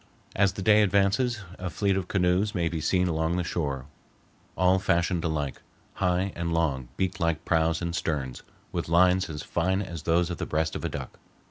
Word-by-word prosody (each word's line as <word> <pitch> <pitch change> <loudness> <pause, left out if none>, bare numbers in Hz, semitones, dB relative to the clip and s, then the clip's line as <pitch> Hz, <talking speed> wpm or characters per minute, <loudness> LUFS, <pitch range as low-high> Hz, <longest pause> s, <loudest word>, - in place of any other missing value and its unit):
As 100 -2 +3
the 95 - -5
day 105 +1 +6
advances, 105 +4 +2 0.2
a 90 0 -3
fleet 100 +1 +1
of 95 -2 -2
canoes 95 +3 +1
may 85 -2 +1
be 80 -2 -3
seen 90 +3 +2
along 80 +1 0
the 90 - 0
shore, 70 -7 -2 0.7
all 90 +1 +4
fashioned 85 -1 +1
alike, 75 -5 -2 0.3
high 90 +1 0
and 85 0 -2
long 75 -7 0
beak 95 +1 -1
like 85 -2 0
prows 80 0 +1
and 85 0 -2
sterns, 70 -6 -2 0.3
with - - -3
lines 90 +2 +4
as 75 -2 -5
fine 95 +3 0
as 85 -4 -7
those 85 +2 +1
of 85 - -4
the - - -3
breast 80 +1 -1
of - - -4
a - - -1
duck. - - -7
85 Hz, 195 wpm, -27 LUFS, 80-95 Hz, 0.7 s, day